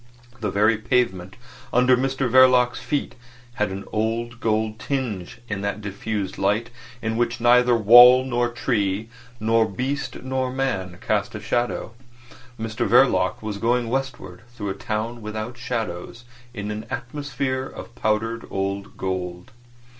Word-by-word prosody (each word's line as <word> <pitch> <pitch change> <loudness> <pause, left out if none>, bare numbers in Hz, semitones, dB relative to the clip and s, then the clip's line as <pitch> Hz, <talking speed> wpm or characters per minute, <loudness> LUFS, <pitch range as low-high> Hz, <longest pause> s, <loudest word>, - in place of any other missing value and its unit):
The 110 - -1
very 105 +2 +3
pavement 95 -6 0 0.4
under 125 +1 +5
Mr 135 +1 0
Verloc's 125 0 +5
feet 145 - -2 0.5
had 105 - +2
an 95 +1 -5
old 115 +2 -2
gold 110 0 0
tinge 125 -10 -3
in 100 -3 -3
that 100 +1 -2
diffused 100 -1 -4
light, 105 +5 +1 0.3
in 110 0 -1
which 120 0 0
neither 125 +1 +5
wall, 120 +4 +8
nor 120 -2 0
tree, 110 -3 -1 0.3
nor 110 +1 +3
beast, 130 +9 -3
nor 130 -1 -1
man 115 -10 -2
cast - - 0
a - - -4
shadow. 120 -1 -1 0.7
Mr 110 -1 -2
Verloc - - +3
was 105 -2 -4
going 120 +1 +1
westward 125 -8 -4
through 105 -3 -4
a - - -1
town 110 +4 -4
without 110 +2 -5
shadows 115 -3 -4 0.3
in 105 -3 -5
an 110 +2 -6
atmosphere 130 +1 -3
of 115 - -10
powdered 115 +1 -1
old 100 0 -3
gold. 90 -2 -4
115 Hz, 140 wpm, -23 LUFS, 105-125 Hz, 0.7 s, wall